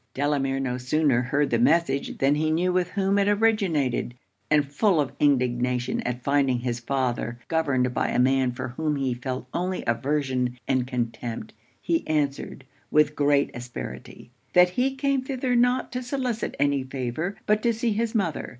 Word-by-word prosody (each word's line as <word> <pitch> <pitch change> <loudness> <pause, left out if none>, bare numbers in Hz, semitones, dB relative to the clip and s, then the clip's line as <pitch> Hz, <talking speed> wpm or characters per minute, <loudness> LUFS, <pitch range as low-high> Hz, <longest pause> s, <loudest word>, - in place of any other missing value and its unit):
Delamere 135 -1 0
no 125 -2 -2
sooner 130 0 +2
heard 140 +3 0
the 115 - +2
message, 140 +1 +2
than 135 +1 +3
he 155 +1 0
knew 175 +3 +1
with 180 -1 +1
whom 195 +1 +1
it 200 - +2
originated; 195 - +1 0.3
and 150 -1 +4
full 160 +6 +2
of 140 -3 0
indignation 125 -3 +1
at 125 0 -4
finding 135 -3 +2
his 120 -1 -2
father 120 -2 -2
governed 130 -6 +1
by - - 0
a - - -1
man 130 0 +3
for 125 - -5
whom 150 +4 -2
he 135 -3 -1
felt 125 +1 -5
only 185 +1 -2
aversion 125 0 -1
and 130 -2 +1
contempt, 120 -2 -4 0.3
he 165 -1 0
answered, 145 -3 -2 0.2
with 150 0 +3
great 145 -1 +2
asperity 120 - -8 0.2
'That 180 0 +6
he 260 +7 0
came 275 0 +1
thither 260 -1 -1
not 245 +1 +2
to 250 - -3
solicit 250 -2 -3
any 140 -1 +2
favour, 130 +8 -4
but 210 0 +2
to 235 - +2
see 230 +1 -1
his 230 +2 -1
mother. 185 -8 -1
145 Hz, 170 wpm, -25 LUFS, 125-185 Hz, 0.3 s, That